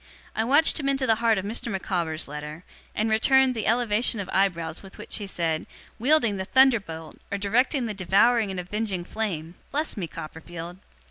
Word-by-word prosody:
I 220 - +1
watched 290 +8 +5
him 275 -2 0
into 270 -1 +1
the 225 - +4
heart 225 -2 +3
of 190 - -3
Mr. 230 +2 -3
Micawber's 175 -5 -2
letter, 150 +3 -7 0.3
and 220 +1 0
returned 265 +4 +4
the 225 -3 -3
elevation 230 0 +2
of 190 -2 -5
eyebrows 170 -4 0
with 195 -1 -14
which - - -4
he 205 - -5
said 165 -4 -1 0.3
"'Wielding 240 -5 +3
the 190 - -3
thunderbolt, 205 -11 +2
or 200 - -1
directing 245 +6 +1
the 220 - -3
devouring 205 +4 +3
and 190 -1 -4
avenging 190 0 -3
flame!" 175 -5 -4 0.2
Bless 300 +3 -2
me, 190 -6 -3
Copperfield! 165 +3 -8
205 Hz, 180 wpm, -25 LUFS, 175-235 Hz, 0.3 s, watched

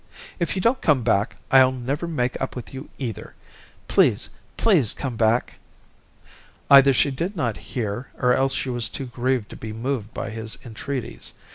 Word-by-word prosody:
"If 170 - -1
you 185 - -2
don't 250 +3 +2
come 140 -6 +3
back, 110 0 +1 0.2
I'll 130 -1 +7
never 130 +6 -3
make 125 -7 -1
up 135 - -3
with 125 0 -8
you, 135 +2 -8
either. 120 -6 -6 0.5
Please, - - +3 0.3
please, 170 - +3
come 130 -4 -4
back." 115 +2 +1 1.1
Either 140 0 +9
she 140 +2 +3
did 170 +10 -3
not 120 - -1 0.2
hear, 115 +1 -2
or 125 0 +3
else 135 +1 +2
she 130 - -2
was 120 -2 -1
too 135 - -5
grieved 125 -2 -1
to - - -8
be 110 -1 -7
moved 115 -1 -3
by - - -5
his 110 -3 -3
entreaties. 125 +2 -5
130 Hz, 170 wpm, -23 LUFS, 115-140 Hz, 1.1 s, Either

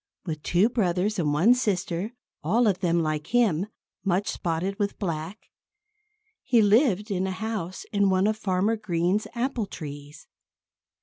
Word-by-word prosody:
With 155 -4 -4
two 180 +6 +3
brothers 200 -3 0
and 150 -4 +1
one 175 +12 +5
sister 195 -4 -1 0.3
all 220 +10 +3
of 195 -4 +2
them, 170 -3 +1
like 155 -1 -2
him, 210 -7 +2 0.4
much 195 +1 0
spotted 175 +4 -2
with 200 -1 -1
black 170 +1 -5 0.9
he 245 -3 +3
lived 210 -1 +3
in 190 -1 0
a - - -2
house 190 -3 -4
in 200 -1 +3
one 190 0 +3
of 215 +1 +2
Farmer 205 +1 0
Green's 185 0 0
apple 240 -3 -1
trees. 145 -3 -9
190 Hz, 145 wpm, -26 LUFS, 170-215 Hz, 0.9 s, one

